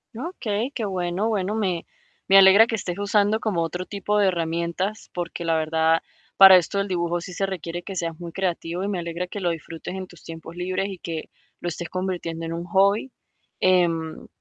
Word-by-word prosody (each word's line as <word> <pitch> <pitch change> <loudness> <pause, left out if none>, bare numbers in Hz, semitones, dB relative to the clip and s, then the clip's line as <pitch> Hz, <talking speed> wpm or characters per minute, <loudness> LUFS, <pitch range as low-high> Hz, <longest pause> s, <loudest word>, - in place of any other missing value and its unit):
Okey, 235 - -3
qué 225 - -2
bueno. 185 +2 -1
Bueno, 210 -1 -1
me 185 -6 -1 0.4
me 195 - +7
alegra 195 +4 +8
que 225 - -1
estés 180 -4 -4
usando, 205 +1 +2
como 180 -7 0
otro 180 +2 -4
tipo 205 +1 -1
de 200 - +4
herramientas, 170 +4 -2
porque 175 -1 -4
la 165 -1 +1
verdad, 160 +1 +2 0.4
para 190 -1 +11
esto 185 +3 +2
del 200 0 0
dibujo, 175 -1 -1
sí 180 +2 -8
se 195 - 0
requiere 175 -2 -5
que 195 +2 -7
seas 165 -2 -3
muy 170 -1 -7
creativo, 175 -1 -2
y 200 - -1
me 195 -3 -2
alegra, 170 +1 -4
que 205 - -6
lo 175 - +1
disfrutes 165 +1 -6
en 190 -1 -5
tus 175 -3 -17
tiempos 165 0 -9
libres, 185 +2 -2
y 190 -3 -7
que 165 -2 -5 0.3
lo 175 - -5
estés 170 0 -4
convirtiendo 175 -3 -3
en 165 - -4
un 170 +1 -4
hobby, 200 +7 +2 0.5
em, 170 -3 +1
180 Hz, 200 wpm, -24 LUFS, 170-195 Hz, 0.5 s, para